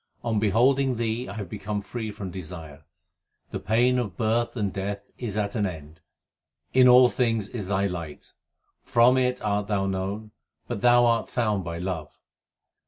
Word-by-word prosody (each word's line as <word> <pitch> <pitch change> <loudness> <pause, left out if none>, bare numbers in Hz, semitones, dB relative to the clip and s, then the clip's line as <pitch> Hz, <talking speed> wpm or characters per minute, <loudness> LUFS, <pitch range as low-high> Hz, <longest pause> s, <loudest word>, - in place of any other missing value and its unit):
On 115 -3 0
beholding 125 +6 +3
Thee 115 +1 -2
I - - -6
have 100 -3 -5
become 105 +4 -4
free 110 +2 -5
from 100 -3 -6
desire; 80 -5 -9 0.7
the - - -3
pain 120 +5 +2
of 105 -7 -4
birth 115 +2 0
and 100 -4 -1
death 100 +1 -5
is 110 -4 -4
at 100 -1 -1
an 105 -4 0
end. 80 -2 -9 0.7
In 130 0 +6
all 125 0 +8
things 115 -5 0
is 105 -6 -5
Thy 100 0 +1
light; 85 -6 -6 0.5
from 120 +2 +4
it 125 -1 +1
art 105 -1 0
Thou 100 -2 0
known, 95 +3 -3 0.4
but 120 -4 -4
Thou 120 0 +6
art 115 -1 +1
found 105 -5 0
by 85 -1 -5
love. 85 -4 -5
105 Hz, 170 wpm, -26 LUFS, 95-120 Hz, 0.7 s, all